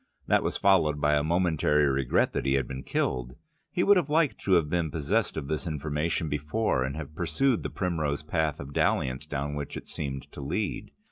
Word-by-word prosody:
That -, -, +3 dB
was -, -, -1 dB
followed 80 Hz, -7 st, +3 dB
by 75 Hz, 0 st, +3 dB
a 75 Hz, -, +3 dB
momentary 80 Hz, -3 st, +2 dB
regret 65 Hz, -2 st, +1 dB
that -, -, -2 dB
he 65 Hz, -, +3 dB
had 65 Hz, -2 st, 0 dB
been 65 Hz, -1 st, -5 dB
killed: 60 Hz, -1 st, -2 dB, 0.4 s
he -, -, +1 dB
would 205 Hz, -1 st, +6 dB
have 170 Hz, -5 st, 0 dB
liked 155 Hz, -1 st, +2 dB
to 95 Hz, -, +1 dB
have 85 Hz, -4 st, +4 dB
been 85 Hz, 0 st, 0 dB
possessed 85 Hz, +9 st, 0 dB
of 70 Hz, -3 st, -4 dB
this 80 Hz, +4 st, -2 dB
information 80 Hz, +2 st, -1 dB
before, 75 Hz, +2 st, 0 dB
and 65 Hz, +2 st, -3 dB
have 75 Hz, -1 st, -7 dB
pursued 90 Hz, -, +1 dB
the -, -, -3 dB
primrose 80 Hz, -6 st, -2 dB
path 80 Hz, -1 st, -1 dB
of 70 Hz, +1 st, -8 dB
dalliance 65 Hz, +2 st, 0 dB
down 75 Hz, 0 st, -3 dB
which 75 Hz, -1 st, -5 dB
it -, -, -9 dB
seemed 70 Hz, -2 st, -4 dB
to -, -, -8 dB
lead. 90 Hz, +9 st, -2 dB
75 Hz, 205 wpm, -28 LUFS, 70-85 Hz, 0.4 s, would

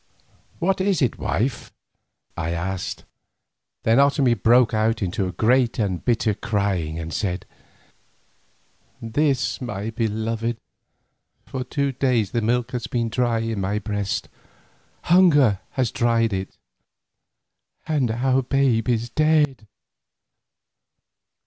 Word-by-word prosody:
"What 185 Hz, +2 st, 0 dB
is 195 Hz, -1 st, +1 dB
it, 125 Hz, -, 0 dB
wife?" 125 Hz, +4 st, -2 dB, 0.6 s
I 85 Hz, -1 st, -3 dB
asked. 90 Hz, +2 st, -4 dB, 0.8 s
Then 115 Hz, +3 st, +4 dB
Otomie 140 Hz, -3 st, +4 dB
broke 120 Hz, +2 st, +4 dB
out 110 Hz, 0 st, +1 dB
into 95 Hz, +1 st, -1 dB
a -, -, -4 dB
great 120 Hz, +4 st, +2 dB
and 95 Hz, -5 st, -1 dB
bitter 115 Hz, -3 st, +1 dB
crying 100 Hz, -8 st, -1 dB
and 80 Hz, -1 st, -5 dB
said: 90 Hz, -3 st, -2 dB, 1.5 s
"This, 135 Hz, +4 st, 0 dB
my 110 Hz, -3 st, -4 dB
beloved: 115 Hz, +1 st, -2 dB, 0.9 s
for 130 Hz, -1 st, -4 dB
two 140 Hz, +2 st, -1 dB
days 120 Hz, -6 st, 0 dB
the 115 Hz, -, 0 dB
milk 120 Hz, +2 st, 0 dB
has 125 Hz, -1 st, -3 dB
been 115 Hz, -2 st, -1 dB
dry 115 Hz, 0 st, 0 dB
in 115 Hz, -3 st, -2 dB
my 100 Hz, +2 st, -1 dB
breast—hunger 115 Hz, -, 0 dB
has 130 Hz, -3 st, 0 dB
dried 115 Hz, -4 st, +1 dB
it—and 125 Hz, -, -7 dB
our 130 Hz, +4 st, +1 dB
babe 130 Hz, -3 st, +1 dB
is 120 Hz, -1 st, 0 dB
dead! 150 Hz, -7 st, +2 dB
115 Hz, 110 wpm, -23 LUFS, 105-130 Hz, 1.5 s, Then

